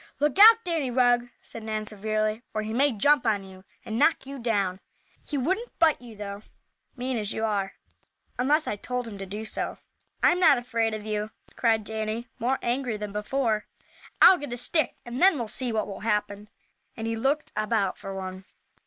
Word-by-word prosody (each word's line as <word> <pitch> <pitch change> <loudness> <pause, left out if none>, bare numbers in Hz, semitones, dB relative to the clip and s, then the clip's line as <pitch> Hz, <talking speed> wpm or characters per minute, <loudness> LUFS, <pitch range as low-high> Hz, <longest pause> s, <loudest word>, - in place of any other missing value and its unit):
"Look 295 +5 +1
out, 455 +2 +9
Danny 325 -7 -1
Rugg," 245 -1 +3
said 230 - -8
Nan, 215 -1 -3
severely, 215 +1 -1
"or 215 - 0
he 215 +1 -4
may 275 +4 +3
jump 285 +7 +3
on 210 -4 +1
you, 190 0 -14 0.2
and 220 +1 -3
knock 325 - +3
you 275 0 -7
down. 200 -6 0 0.5
He 295 - -2
wouldn't 375 - -2
bite 320 -5 +3
you, 235 -3 -11
though, 200 0 -7 0.5
mean 250 -1 -2
as 210 -1 -1
you 220 - -1
are, 200 -3 -1 0.7
unless 300 +5 +2
I 205 - -3
told 250 +3 -4
him 205 -3 -8
to 195 - -6
do 210 +3 -6
so." - - -3 0.5
"I'm 355 - +5
not 315 -6 +6
afraid 230 -2 -1
of 215 -1 -7
you!" 210 0 -2 0.3
cried 225 -2 +2
Danny, 220 +2 -3
more 255 +4 +1
angry 240 -2 -1
than 210 -1 -5
before. 215 0 -1 0.6
"I'll 370 -1 +9
get 285 -4 -6
a - - -4
stick 310 +6 0
and 240 +2 -5
then 380 -1 +7
we'll 235 -3 -3
see 245 +3 -3
what 215 -2 0
will 200 -1 -7
happen," 210 -1 -2 0.5
and 225 - -4
he 225 0 -1
looked 275 +7 0
about 215 -3 0
for 195 -1 -8
one. 185 0 -6
225 Hz, 195 wpm, -26 LUFS, 210-265 Hz, 0.7 s, out